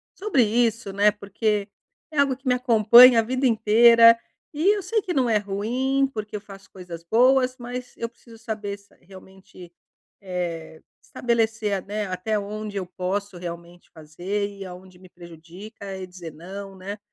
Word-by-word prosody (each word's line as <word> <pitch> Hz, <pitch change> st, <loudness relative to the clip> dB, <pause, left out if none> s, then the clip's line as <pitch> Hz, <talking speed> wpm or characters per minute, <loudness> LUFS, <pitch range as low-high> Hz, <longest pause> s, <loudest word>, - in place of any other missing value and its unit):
sobre 385 Hz, -10 st, +1 dB
isso, 225 Hz, -2 st, 0 dB
né, 205 Hz, +1 st, +4 dB
porque 205 Hz, 0 st, -2 dB, 0.4 s
é 305 Hz, -, -8 dB
algo 275 Hz, -2 st, +3 dB
que 265 Hz, +1 st, -13 dB
me 250 Hz, -, +4 dB
acompanha 240 Hz, 0 st, +7 dB
a -, -, +5 dB
vida 255 Hz, +3 st, -2 dB
inteira 230 Hz, 0 st, +6 dB, 0.4 s
e 355 Hz, +8 st, +2 dB
eu 410 Hz, -, -3 dB
sei 425 Hz, +4 st, -1 dB
que 365 Hz, -, -4 dB
não 260 Hz, -5 st, +1 dB
é 220 Hz, -, +3 dB
ruim 250 Hz, +7 st, -1 dB
porque 215 Hz, -1 st, -6 dB
eu 205 Hz, -, -5 dB
faço 195 Hz, -1 st, -14 dB
coisas 175 Hz, -3 st, -10 dB
boas, 255 Hz, +6 st, +3 dB
mas 245 Hz, +1 st, -7 dB
eu 230 Hz, -, -3 dB
preciso 230 Hz, -1 st, -18 dB
saber 215 Hz, -2 st, -5 dB
se 200 Hz, 0 st, -26 dB
realmente, 185 Hz, -1 st, -15 dB, 0.5 s
eh, 170 Hz, -4 st, -5 dB, 0.2 s
estabelecer, 225 Hz, -4 st, -1 dB
né, 210 Hz, 0 st, -4 dB
até 185 Hz, +4 st, -2 dB
onde 210 Hz, 0 st, -6 dB
eu 185 Hz, -, -3 dB
posso 185 Hz, +1 st, -4 dB
realmente 170 Hz, 0 st, -9 dB
fazer 175 Hz, +6 st, -4 dB
e 200 Hz, -1 st, -10 dB
aonde 185 Hz, 0 st, -12 dB
me 185 Hz, -1 st, -16 dB
prejudica 180 Hz, +4 st, -11 dB
e 185 Hz, -1 st, -7 dB
dizer 180 Hz, -3 st, -10 dB
não, 195 Hz, +5 st, -9 dB
né. 195 Hz, +2 st, -7 dB
205 Hz, 165 wpm, -23 LUFS, 185-235 Hz, 0.5 s, acompanha